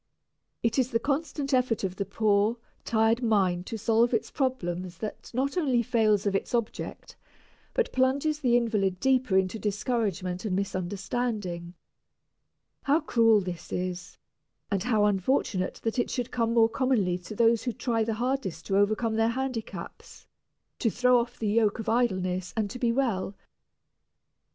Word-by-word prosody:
It 230 +3 +1
is 255 -1 +2
the 230 -3 +1
constant 280 +1 -2
effort 250 -4 +2
of 185 -1 -3
the 200 - -2
poor, 215 +1 +2 0.3
tired 225 +1 +2
mind 190 -6 +1
to 225 - -4
solve 230 +2 +2
its 225 - -2
problems 185 - -2
that 215 +2 -7
not 275 +7 -1
only 260 -7 +2
fails 220 -4 +2
of 200 -1 +1
its 195 - -1
object, 235 -2 -4 0.6
but 485 - +1
plunges 280 +4 +1
the 245 -4 +3
invalid 205 -6 0
deeper 255 -6 +2
into 190 +3 0
discouragement 200 -4 -2
and 205 -4 -1
misunderstanding. 190 -1 -3 1.1
How 285 +3 +3
cruel 225 -7 +4
this 180 -3 -7
is, 180 0 -4 0.5
and 195 -2 +1
how 220 -2 +2
unfortunate 195 -1 0
that 225 +2 -1
it - - 0
should 245 -1 -3
come 230 -1 0
more 225 -1 +6
commonly 225 -7 +1
to 180 +4 -9
those 230 +1 +3
who 245 - 0
try 230 -1 -1
the 220 0 -1
hardest 235 -9 -2
to 195 - +1
overcome 215 +3 +2
their 225 0 +3
handicaps, 255 -2 -5 0.5
to 230 - +2
throw 250 +2 +4
off 240 +1 -4
the 220 - -2
yoke 215 0 +2
of 225 - -6
idleness 185 -6 0
and 210 -2 0
to 250 - -7
be 240 -1 +2
well. 230 -7 -1
225 Hz, 155 wpm, -28 LUFS, 195-245 Hz, 1.1 s, more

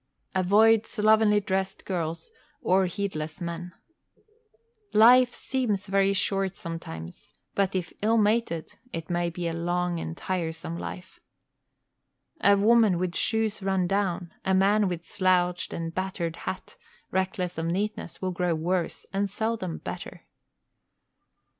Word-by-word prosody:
Avoid 215 +4 +4
slovenly 215 -1 +4
dressed 190 -1 -2
girls 170 - -3 0.3
or 190 0 +3
heedless 165 -4 -4
men. 170 0 -5 1.2
Life 245 +3 +7
seems 240 -9 -1
very 195 0 +3
short 195 -1 0
sometimes, 165 - -8 0.2
but 195 -1 +1
if 180 -2 -2
ill 225 +2 +3
mated 210 -6 0
it 165 0 -5
may 175 0 +1
be 170 0 -4
a 165 - -2
long 175 +1 -1
and 165 0 -5
tiresome 165 -2 -3
life. 180 +1 -7 1.2
A 200 -9 +5
woman 215 -2 +5
with 180 0 -1
shoes 220 -2 0
run 190 -1 +1
down, 185 -2 -1
a 190 - +2
man 200 +2 +4
with 175 -2 -4
slouched 180 -1 +1
and 165 0 -4
battered 185 -3 -2
hat, 185 - -6 0.3
reckless 185 -2 -1
of 165 - -1
neatness, 195 0 -3
will 185 - 0
grow 180 -1 0
worse, 170 +1 -2
and 200 +1 0
seldom 215 -4 -2
better. - - -7
185 Hz, 130 wpm, -27 LUFS, 170-205 Hz, 1.2 s, Life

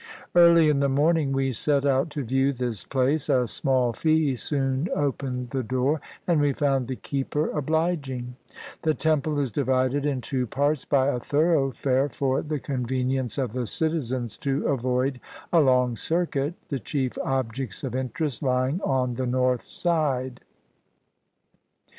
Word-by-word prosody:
Early 170 -2 +7
in 150 -2 +3
the 140 0 +2
morning 150 +1 +2
we 135 -1 0
set 140 +4 +1
out 135 +3 +2
to 150 -2 -4
view 135 +3 +1
this 120 -5 -3
place; 140 +3 0
a 130 -3 +3
small 130 -1 +1
fee 155 -1 +2
soon 135 +4 -1
opened 130 -3 -2
the 135 - -1
door, 130 +6 0 0.2
and 170 -4 +2
we 145 -1 +2
found 135 -4 0
the 130 - -3
keeper 140 +4 -2
obliging. 145 -5 -1 0.5
The 155 -2 +1
temple 155 -1 0
is 140 -4 0
divided 130 +2 +1
in 145 -3 0
two 125 +1 -2
parts 145 +4 0
by 135 -1 +2
a 125 - -1
thoroughfare 140 -2 +1
for 135 -1 0
the 150 -1 -3
convenience 130 -2 -2
of 130 -5 -2
the 125 -2 -2
citizens 130 -9 -1
to 140 - -4
19 - - -5
CHINA - - +1
avoid 130 +1 0 0.3
a 170 - +6
long 125 -4 +3
circuit, 160 +1 -1
the 140 - -2
chief 130 +3 -2
objects 130 -3 -3
of 130 -4 -3
interest 130 +2 -2
lying 130 +5 0
on 130 -2 0
the 130 +1 -2
north 125 0 +1
side. 140 -7 -1
135 Hz, 155 wpm, -25 LUFS, 125-150 Hz, 0.5 s, Early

